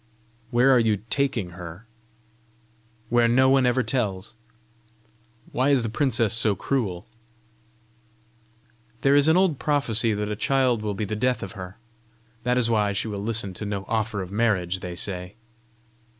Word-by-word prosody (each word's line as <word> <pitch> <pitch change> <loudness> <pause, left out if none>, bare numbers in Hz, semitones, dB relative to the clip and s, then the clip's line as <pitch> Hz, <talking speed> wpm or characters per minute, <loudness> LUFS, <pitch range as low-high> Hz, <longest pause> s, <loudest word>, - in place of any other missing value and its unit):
"Where 125 +3 +4
are 130 - +5
you 110 -3 +1
taking 130 -10 -1
her?" 90 +3 -10 1.2
"Where 120 0 +3
no 130 +3 +4
one 135 -1 +4
ever 125 +1 +2
tells!" 105 -5 -2 1.2
"Why 130 +3 +1
is 135 -4 +3
the 115 - -2
princess 115 -5 +1
so 110 -2 +2
cruel?" 100 -6 -2 2.0
"There 140 +1 +4
is 145 +1 +5
an 160 +2 +5
old 185 -7 +2
prophecy 115 -7 +1
that 105 0 -2
a 105 - -3
child 130 -1 +1
will 105 -1 -3
be 105 - -2
the 105 - -4
death 125 +3 0
of 95 - -6
her. 95 0 -9 0.6
That 125 +1 0
is 120 -2 +4
why 105 -3 +1
she 100 - -2
will 100 -1 -4
listen 110 -2 -2
to 90 - -6
no 100 -2 -4
offer 110 -2 -1
of 90 - -10
marriage, 100 -5 0
they 90 -1 -6
say." 90 0 -4
110 Hz, 160 wpm, -24 LUFS, 100-125 Hz, 2.0 s, are